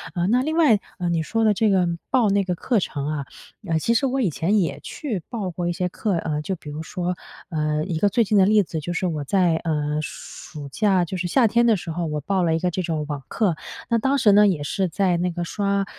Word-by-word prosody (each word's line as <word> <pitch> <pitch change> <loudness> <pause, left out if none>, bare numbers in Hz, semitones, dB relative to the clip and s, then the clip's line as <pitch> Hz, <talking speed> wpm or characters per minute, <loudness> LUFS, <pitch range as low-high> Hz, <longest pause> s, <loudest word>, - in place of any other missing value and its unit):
啊， 175 -1 +1
那 245 +5 +3
另 315 +3 -1
外， 275 -11 +5 0.2
呃， 180 - -1
你 170 -1 +1
说 225 +7 0
的 215 -1 +4
这 215 +2 +2
个 185 -3 +3 0.2
报 245 -5 +3
那 200 0 +2
个 180 -2 -2
课 230 +6 +1
程 145 -6 -3
啊， 150 -2 -3 0.4
呃， 165 -2 +1
其 230 - +1
实 235 +4 +2
我 265 +1 0
以 210 - +2
前 190 +8 +1
也 145 -6 -1
去 230 - -4
报 210 -7 -3
过 175 +1 -3
一 175 - 0
些 180 +1 -1
课。 195 0 -1
呃， 155 -2 -2
就 190 +5 -3
比 160 - -15
如 150 +2 -5
说， 180 +1 -3 0.3
呃， 155 -2 -1
一 170 -4 -2
个 205 - +3
最 230 +4 +3
近 210 0 +1
的 190 - +6
例 210 0 +5
子， 160 -2 -4
就 155 +3 -5
是 180 - -1
我 155 -4 -2
在， 175 +2 +2
呃， 150 -2 -1
暑 145 -1 -8
假 190 +2 +2
就 180 - -5
是 180 0 -2
夏 240 +7 +3
天 235 +3 +3
的 230 -2 +5
时 170 -1 -6
候， 170 +1 -2
我 150 -1 -2
报 190 +5 0
了 165 -2 +2
一 - - 0
个 180 +1 0
这 185 - -2
种 160 -3 -2
网 145 -2 -4
课。 200 -7 0 0.3
那 235 - +3
当 270 +4 +1
时 220 -6 +5
呢 205 +1 +6
也 170 -7 0
是 190 +6 -1
在 185 +1 +1
那 180 +1 0
个 175 0 -3
刷， 200 +2 -1
180 Hz, 280 characters per minute, -23 LUFS, 160-210 Hz, 0.4 s, 的